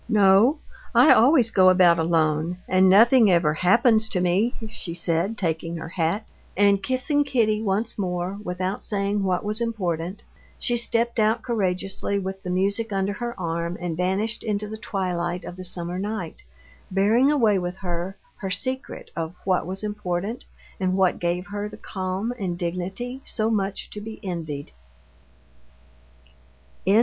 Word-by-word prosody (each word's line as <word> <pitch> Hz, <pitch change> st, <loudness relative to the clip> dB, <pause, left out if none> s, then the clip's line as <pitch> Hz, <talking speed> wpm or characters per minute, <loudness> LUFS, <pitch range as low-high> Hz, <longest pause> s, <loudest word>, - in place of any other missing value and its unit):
"No, 210 Hz, +7 st, +5 dB, 0.4 s
I -, -, +8 dB
always 245 Hz, -2 st, +5 dB
go 185 Hz, -1 st, +6 dB
about 180 Hz, -2 st, +5 dB
alone 160 Hz, +1 st, +1 dB
and 185 Hz, 0 st, +4 dB
nothing 225 Hz, +3 st, +6 dB
ever 170 Hz, -4 st, +3 dB
happens 220 Hz, +6 st, +3 dB
to 185 Hz, -, 0 dB
me," 185 Hz, +7 st, +1 dB
she 170 Hz, -5 st, -6 dB
said, 170 Hz, +5 st, 0 dB
taking 165 Hz, -2 st, -2 dB
her 165 Hz, 0 st, -7 dB
hat. 175 Hz, +5 st, -1 dB, 0.3 s
And 200 Hz, 0 st, +4 dB
kissing 260 Hz, +7 st, 0 dB
Kitty 225 Hz, -6 st, +1 dB
once 215 Hz, +2 st, -1 dB
more, 180 Hz, +1 st, -2 dB
without 185 Hz, +2 st, -3 dB
saying 200 Hz, 0 st, -1 dB
what 185 Hz, -2 st, 0 dB
was 215 Hz, +2 st, -1 dB
important, 185 Hz, -5 st, -3 dB, 0.3 s
she 240 Hz, -, 0 dB
stepped 235 Hz, 0 st, 0 dB
out 220 Hz, +2 st, +2 dB
courageously 195 Hz, -3 st, -1 dB
with 190 Hz, 0 st, -4 dB
the 180 Hz, -, -6 dB
music 200 Hz, +5 st, 0 dB
under 195 Hz, 0 st, 0 dB
her 235 Hz, 0 st, -5 dB
arm 170 Hz, 0 st, -2 dB
and 175 Hz, -2 st, -3 dB
vanished 190 Hz, +6 st, -1 dB
into 210 Hz, -1 st, -2 dB
the 215 Hz, -, -6 dB
twilight 180 Hz, -4 st, -3 dB
of -, -, -7 dB
the 185 Hz, -, -8 dB
summer 175 Hz, 0 st, 0 dB
night, 200 Hz, -4 st, -4 dB, 0.5 s
bearing 215 Hz, +8 st, +3 dB
away 225 Hz, -9 st, +3 dB
with 180 Hz, +1 st, -4 dB
her 175 Hz, +2 st, -3 dB, 0.2 s
her 195 Hz, -, -5 dB
secret 260 Hz, +7 st, -3 dB
of 165 Hz, +1 st, -4 dB
what 185 Hz, -3 st, +1 dB
was 190 Hz, +2 st, -4 dB
important 205 Hz, +1 st, -3 dB, 0.3 s
and 185 Hz, 0 st, 0 dB
what 190 Hz, -2 st, +2 dB
gave 175 Hz, +1 st, -1 dB
her 205 Hz, +1 st, -5 dB
the -, -, -11 dB
calm 190 Hz, +4 st, -3 dB
and 180 Hz, -3 st, -2 dB
dignity 190 Hz, +9 st, -4 dB
so 220 Hz, -1 st, -1 dB
much 200 Hz, -2 st, -2 dB
to 210 Hz, -, -7 dB
be 220 Hz, +1 st, -8 dB
envied. 160 Hz, -6 st, -5 dB
195 Hz, 155 wpm, -24 LUFS, 180-220 Hz, 0.5 s, I